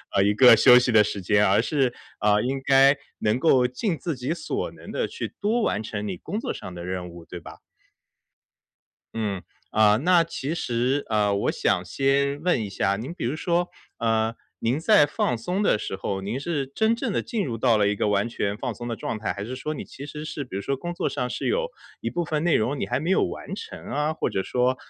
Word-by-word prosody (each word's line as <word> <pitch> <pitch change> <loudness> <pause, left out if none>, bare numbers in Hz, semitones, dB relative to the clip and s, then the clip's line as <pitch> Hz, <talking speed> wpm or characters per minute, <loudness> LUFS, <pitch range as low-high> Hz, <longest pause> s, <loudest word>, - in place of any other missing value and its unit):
呃， 100 - +5
一 105 +1 +3
个 125 0 +8
休 125 +3 +8
息 125 - 0
的 110 -2 +6
时 100 -1 -4
间。 105 +3 +3
而 100 +3 +4
是， 130 -2 +1 0.3
啊， 105 0 +3
应 135 +3 -2
该 135 +1 +6 0.2
能 110 +3 +1
够 130 -5 +4
尽 165 - -2
自 165 -2 -3
己 130 +6 -2
所 170 - -3
能 - - -13
地 - - -1
去 - - -6
多 220 +3 +1
完 105 - 0
成 105 -1 -4
你 95 - -3
工 210 - -4
作 - - -3
上 90 - -8
的 85 0 -7
任 90 -1 -4
务， 85 -1 -12
对 90 0 -8
吧？ - - -11 1.6
嗯。 105 -4 -2 0.3
啊， 105 -1 +5
那 170 +5 +4
其 160 -1 -4
实 125 0 0
呃 105 -1 +2
我 100 - +1
想 90 - 0
先 140 +8 +1
问 180 -8 +2
一 - - -5
下， 100 0 +1
您 125 +10 -6
比 - - -7
如 125 +5 -1
说 175 +2 0 0.3
呃， 115 0 +1 0.2
您 125 +6 0
在 205 -3 +5
放 125 -4 -1
松 180 - -2
的 200 - +3
时 95 - -4
候， 95 0 -3
您 110 +7 -3
是 145 -2 -2
真 220 +12 +1
正 235 -3 -3
地 - - +1
进 215 -6 -2
入 120 -4 -3
到 115 -1 +3
了 105 -1 +3
一 105 - +1
个 - - 0
完 105 +2 +1
全 105 -3 -2
放 - - -3
松 120 0 -7
的 115 - -2
状 110 - -4
态？ 105 -3 -2
还 100 +1 -5
是 130 +2 -5
说 155 +4 -4
你 - - -5
其 140 +2 -10
实 150 +1 -7
是 150 -2 -4
比 120 - -9
如 100 - -3
说 140 - -1
工 175 +6 -5
作 - - -1
上 125 -3 -2
是 - - -3
有 485 +3 +1 0.3
一 - - -2
部 175 -1 -2
分 155 0 -1
内 175 - +3
容， 130 +6 0
你 - - -2
还 - - 0
没 170 +5 -1
有 - - +4
完 - - -6
成 200 - -7
啊？ 150 +2 0
或 - - -1
者 95 - 0
说， 125 +5 +1
125 Hz, 255 characters per minute, -25 LUFS, 105-155 Hz, 1.6 s, 个